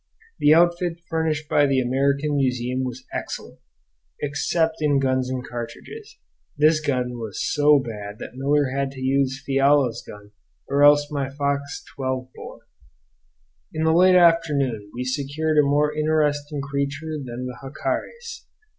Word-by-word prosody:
The 145 - +4
outfit 175 +1 +3
furnished 160 -2 -1
by 145 -1 +3
the 135 -1 +2
American 140 +3 0
Museum 125 -1 0
was 130 0 -6
excellent - - -6 0.6
except 160 +3 0
in 150 -2 +2
guns 130 -1 0
and 130 -1 -4
cartridges; 120 -1 -8 0.4
this 155 +1 +4
gun 125 -5 -2
was 110 -4 -6
so 150 0 +5
bad 105 -5 -6
that - - -9
Miller 140 +1 +1
had 140 0 0
to 135 - -10
use 135 0 0
Fiala's 135 -2 +2
gun 105 0 -13 0.4
or 140 +1 0
else 145 +1 +5
my 140 -2 -2
Fox 140 0 -3
12 130 -1 -3
bore. - - -11 1.1
In 155 - -1
the 160 0 +3
late 185 +2 +5
afternoon 145 - +3
we 125 - -5
secured 145 +4 -1
a - - +8
more 145 +1 +1
interesting 150 -1 0
creature 140 +3 -3
than 125 0 -6
the 125 -1 -7
jacares. 365 - -5
140 Hz, 145 wpm, -23 LUFS, 130-150 Hz, 1.1 s, a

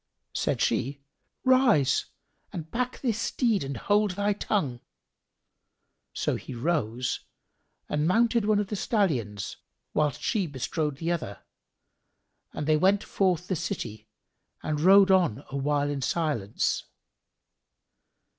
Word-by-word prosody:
Said - - -1
she 140 +2 0 0.4
"Rise 255 - +4 0.4
and 160 -2 -7
back 250 +1 -2
this 230 -5 0
steed 225 - +1
and 135 -2 -4
hold 210 - +2
thy 205 0 +2
tongue!" 155 - -1 1.3
So - - -1
he 130 - -8
rose 125 -4 -1 0.7
and 150 +1 0
mounted 230 +3 +3
one 215 0 +3
of 205 -2 -1
the 210 - -2
stallions, 130 - -1 0.4
whilst 150 -2 +1
she 200 -6 0
bestrode 145 +1 -2
the 165 +3 -1
other, 155 - -4 1.1
and 150 - -4
they 155 0 +4
went 195 +5 +3
forth 180 -3 0
the 185 - 0
city 120 - -5 0.5
and 150 -1 -1
rode 195 +2 +7
on 170 - +3
awhile 145 +1 0
in 140 -1 -3
silence. 135 - 0
165 Hz, 120 wpm, -27 LUFS, 140-205 Hz, 1.3 s, rode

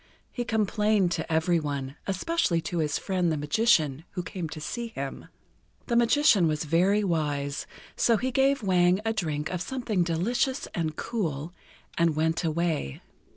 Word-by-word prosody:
He 245 - -3
complained 210 -3 +1
to 165 -2 -3
every 160 +2 +2
one, 140 -3 -4
especially 195 - +1
to 170 +1 -3
his 150 -2 0
friend 180 -3 0
the 155 - 0
Magician 150 - +2
who 180 - -3
came 180 -3 -5
to 155 - -7
see 235 +10 -4
him. 140 -11 -6 0.6
The 235 - -1
Magician 235 - +4
was 155 0 -1
very 180 +7 +2
wise, 145 -5 -1 0.3
so 230 -2 +3
he 255 +5 -2
gave 270 -1 +2
Wang 180 -1 +3
a 225 - +1
drink 155 -7 -2
of 180 -2 -3
something 235 -4 -1
delicious 230 - 0
and 160 -3 -2
cool, 165 -9 -3 0.5
and 165 -2 +3
went 160 +2 0
away. 160 - -1
175 Hz, 155 wpm, -27 LUFS, 155-215 Hz, 0.6 s, Magician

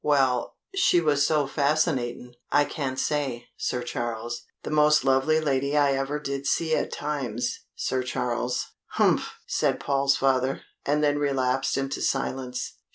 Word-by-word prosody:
"Well, 135 -4 +2 0.2
she 360 - +4
was 150 -4 +2
so 150 -2 +2
fascinatin', 140 -4 0 0.2
I 145 0 +4
can't 135 -5 -3
say, 135 -6 -1
Sir 125 -1 -2
Charles 120 -1 -4 0.2
the - - -5
most 150 0 +4
lovely 135 +4 +3
lady 140 -1 0
I 145 -1 +4
ever 135 +2 -1
did 140 -1 -4
see 160 -1 +2
at - - -1
times, 125 -5 -3 0.2
Sir 130 - -1
Charles." 125 -1 -1 0.3
"Humph," - - +2
said - - 0
Paul's 140 0 +2
father, 135 0 +1 0.2
and 150 +1 +2
then 145 0 +2
relapsed 135 -2 +1
into 135 0 -2
silence. 130 -2 -2
135 Hz, 145 wpm, -26 LUFS, 125-150 Hz, 0.3 s, she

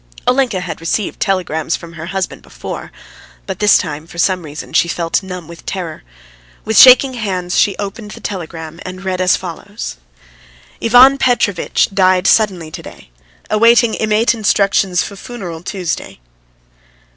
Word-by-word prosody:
Olenka 250 -7 +1
had 180 -2 -6
received 185 +4 -2
telegrams 170 -5 -1
from 170 0 -10
her 165 0 -8
husband 190 0 -4
before, - - -8 0.5
but 190 -2 -5
this 210 0 +5
time 150 +1 -5
for 170 - -13
some 185 +2 +1
reason 150 -2 -9
she - - +3
felt 170 +1 -1
numb 180 -3 -8
with 170 0 -12
terror. 175 -5 -5 0.6
With 220 - -1
shaking 260 +4 +8
hands 185 -6 -3
she 200 - +2
opened 205 +1 -6
the - - -10
telegram 165 -4 -7
and 185 +1 -8
read 185 -1 -1
as 180 0 +4
follows: 195 +4 -7 0.8
"IVAN 255 +4 +6
PETROVITCH 225 -8 +1
DIED 185 -1 +3
SUDDENLY 185 -8 +2
TO - - -7
DAY. - - -13 0.4
AWAITING 230 +1 +4
IMMATE 215 +2 +2
INSTRUCTIONS 200 -4 +1
FUFUNERAL 195 -5 -8
TUESDAY." 180 - -4
190 Hz, 145 wpm, -16 LUFS, 170-215 Hz, 0.8 s, shaking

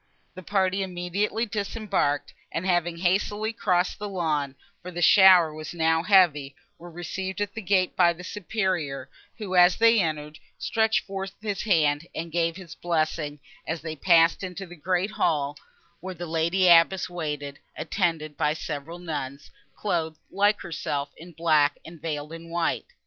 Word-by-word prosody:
The 185 - -9
party 190 0 0
immediately 190 +5 -2
disembarked, 200 -9 -2 0.2
and, 165 - -3
having 175 -2 +1
hastily 205 +5 0
crossed 185 -5 0
the 210 0 -4
lawn—for 165 +1 -4
the 175 -1 -6
shower 185 -4 +7
was 155 +2 -8
now 160 0 +2
heavy—were 170 -3 +1
received 185 +3 -5
at 205 -1 -2
the 220 - -5
gate 185 -2 +1
by 175 -2 +5
the 170 +1 -9
Superior, 180 - -3 0.3
who, 200 -4 -4
as 180 0 +6
they 230 0 +5
entered, 150 -2 -3 0.2
stretched 220 0 +1
forth 195 -1 -5
his 205 -3 -3
hands 160 -5 +2
and 165 +1 -5
gave 165 0 0
his 180 -3 -10
blessing; 155 -3 -2 0.3
and 160 - -1
they 160 -1 -6
passed 165 +1 +4
into 185 0 -6
the 175 -1 -12
great 180 +4 -1
hall, 145 -6 0 0.4
where 185 +2 -7
the 175 +1 -6
lady 170 +3 +1
abbess 175 +2 +5
waited, 150 -5 -5 0.2
attended 160 -2 -1
by 150 +1 +1
several 155 +1 -6
nuns, 145 -5 -6 0.2
clothed, 165 -6 -2
like 205 +2 +2
herself, 145 -4 -3
in 175 +2 -12
black, 155 -3 +2
and 165 -2 -12
veiled 150 -1 -4
in 165 0 -10
white. 170 0 -1
175 Hz, 155 wpm, -26 LUFS, 155-190 Hz, 0.4 s, shower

